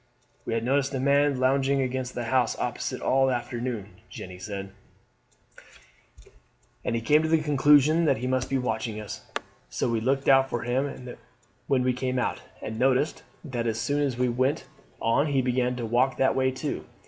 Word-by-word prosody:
"We - - -1
had 115 - -1
noticed 135 +2 +1
a - - -1
man 140 0 +3
lounging 135 +1 +2
against 130 -1 -2
the 120 - -2
house 125 +2 +1
opposite - - -3
all 135 0 +3
the 130 - +2
afternoon," 120 -3 -5
Jeanne 90 0 -9
said, 100 0 -6 2.1
"and 115 -1 -2
came 150 +4 +5
to 160 - -1
the 165 - +5
conclusion 150 +2 +4
that 140 -4 +3
he 125 - -4
must 130 0 0
be 135 - +1
watching 110 -3 -2
us; 105 -3 -7 0.5
so 60 - -1
we 115 -2 0
looked 135 +3 0
out 135 0 +5
for 120 - -3
him 125 +1 -2 0.6
when 130 -3 +2
we 125 0 +2
came 130 0 -2
out, 125 - -1 0.2
and 110 +1 -5
noticed 130 +3 +2 0.2
that 120 -5 -3
as 110 0 -1
soon 145 +5 0
as 135 -4 0
we 125 0 +2
went 130 +4 0 0.3
on 135 +7 +2
he 140 -2 +1
began 125 0 0
to 120 -2 -4
walk 125 +4 +1
that 130 - +2
way 130 0 +2
too. 130 - -4
130 Hz, 185 wpm, -26 LUFS, 120-135 Hz, 2.1 s, came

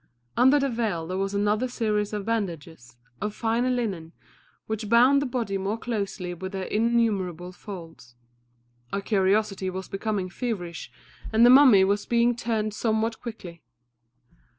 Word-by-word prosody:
Under 260 +4 +5
the 275 - +1
veil 220 -9 -2
there 185 +3 -4
was 195 +1 -2
another 210 +4 +1
series 215 -4 -1
of 210 -2 -4
bandages, 165 - -4 0.2
of 210 0 -3
finer 235 +2 0
linen, 195 -10 -2 0.5
which 220 -1 -4
bound 255 +5 +5
the 285 - -1
body 230 -6 -2
more 200 +3 -2
closely 200 -6 -4
with 190 +2 -7
their 190 -1 -3
innumerable 210 -6 0
folds. 165 - -11 0.8
Our 200 - -2
curiosity 195 -1 +1
was 185 0 -6
becoming 195 -1 -2
feverish, 185 -5 -5 0.4
and 225 +2 +5
the 245 - +8
mummy 255 -8 +8
was 200 +2 0
being 235 0 +3
turned 220 -3 -2
somewhat 220 +1 -1
quickly. 185 -8 -8
210 Hz, 145 wpm, -26 LUFS, 190-235 Hz, 0.8 s, the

